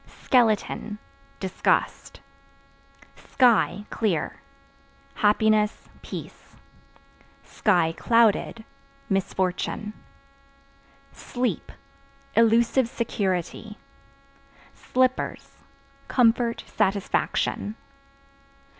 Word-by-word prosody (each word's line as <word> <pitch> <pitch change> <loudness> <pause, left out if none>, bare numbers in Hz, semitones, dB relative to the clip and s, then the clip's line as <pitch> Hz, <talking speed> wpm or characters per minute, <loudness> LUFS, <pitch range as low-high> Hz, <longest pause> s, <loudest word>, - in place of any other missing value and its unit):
Skeleton 220 -3 +1 0.4
Disgust. 190 -1 -1 0.9
Sky 235 -4 +2
(Clear) 190 -9 -1 0.7
happiness, 210 0 +2
peace; - - -9 1.1
(clouded) 215 +5 +2 0.5
misfortune. 195 +2 -1 1.2
Sleep 245 0 -3 0.6
Illusive 230 +2 +3
security. 210 -1 -3 1.0
Slippers 255 0 -1 0.5
Comfort, 235 -1 +2
satisfaction. 200 +1 -1
215 Hz, 45 wpm, -25 LUFS, 200-235 Hz, 1.2 s, Illusive